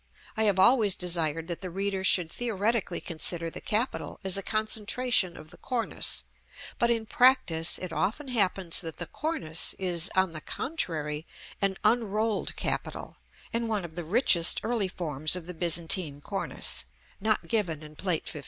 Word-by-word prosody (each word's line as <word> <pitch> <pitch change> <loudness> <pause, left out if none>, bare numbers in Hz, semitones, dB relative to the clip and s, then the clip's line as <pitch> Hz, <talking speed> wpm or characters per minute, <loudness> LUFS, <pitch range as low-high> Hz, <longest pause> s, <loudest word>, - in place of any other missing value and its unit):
I 220 -1 +1
have 200 -3 +3
always 205 -1 +5
desired 165 -3 +1
that 170 -2 -4
the 185 - -4
reader 195 +1 -2
should 180 -3 +3
theoretically 220 -4 -1
consider 165 0 -3
the - - -8
capital 225 +5 -2
as 190 -1 +2
a 195 - +2
concentration 215 -1 0
of 155 - -12
the - - -13
cornice; 245 -3 0 0.5
but 235 - +3
in 230 -2 0
practice 245 - +4
it 180 -3 -6
often 230 - -2
happens 195 -7 +1
that 165 -2 -6
the 175 - -3
cornice 165 - -2
is, 180 -1 +2
on 190 -2 +2
the 155 - -6
contrary, 160 - -4 0.3
an 195 -1 0
unrolled 215 -1 +1
capital; - - -3 0.4
and 230 0 0
one 210 -5 -1
of 165 - -10
the 175 - -4
richest 175 -2 +3
early 225 -3 0
forms 155 -4 +1
of 180 -2 -6
the 180 - -7
Byzantine 165 -2 +2
cornice 195 +6 -2 0.3
(not 210 -4 0
given 170 -7 -1
in 155 0 -12
Plate 180 -1 0
XV. - - -6
190 Hz, 160 wpm, -28 LUFS, 165-220 Hz, 0.5 s, always